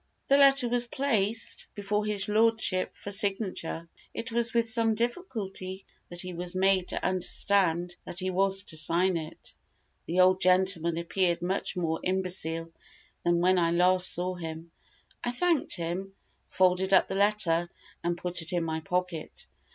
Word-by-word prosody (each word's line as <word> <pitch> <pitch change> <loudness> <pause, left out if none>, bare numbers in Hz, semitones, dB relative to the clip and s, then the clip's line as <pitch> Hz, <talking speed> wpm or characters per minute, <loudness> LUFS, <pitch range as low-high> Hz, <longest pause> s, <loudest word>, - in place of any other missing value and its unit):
The 275 - +5
letter 275 -2 +5
was 240 0 +2
placed 225 -5 -1
before 205 +1 -1
his 205 -2 +1
lordship 220 -3 +2
for 205 - -8
signature. 195 -5 -1 0.3
It 230 - -5
was 235 0 +2
with 235 -1 +1
some 225 -1 +2
difficulty 210 - -4 0.2
that 175 0 -5
he 180 -1 -7
was 175 +1 -5
made 190 -1 +2
to - - -3
understand 180 -1 +1
that - - -8
he 185 0 -2
was 195 +1 +2
to 160 - -3
sign 170 +4 +2
it. 160 -2 -7 0.5
The 180 +3 +2
old 185 +1 +4
gentleman 180 -2 +3
appeared 170 0 -1
much 190 +2 -2
more 160 -2 -1
imbecile 180 -3 -2 0.5
than 170 0 +2
when 185 +1 +3
I 170 -1 +2
last 180 +2 +3
saw 180 +1 -1
him. 165 -1 -8 0.5
I - - -1
thanked 330 +5 +2
him, 185 +3 -4 0.3
folded 190 +1 +2
up - - +4
the - - -5
letter, 195 -4 +1 0.3
and 175 0 -1
put 180 0 -1
it 165 +2 -2
in 175 -1 0
my 160 -1 -3
pocket. 180 0 -4
185 Hz, 160 wpm, -28 LUFS, 175-205 Hz, 0.5 s, The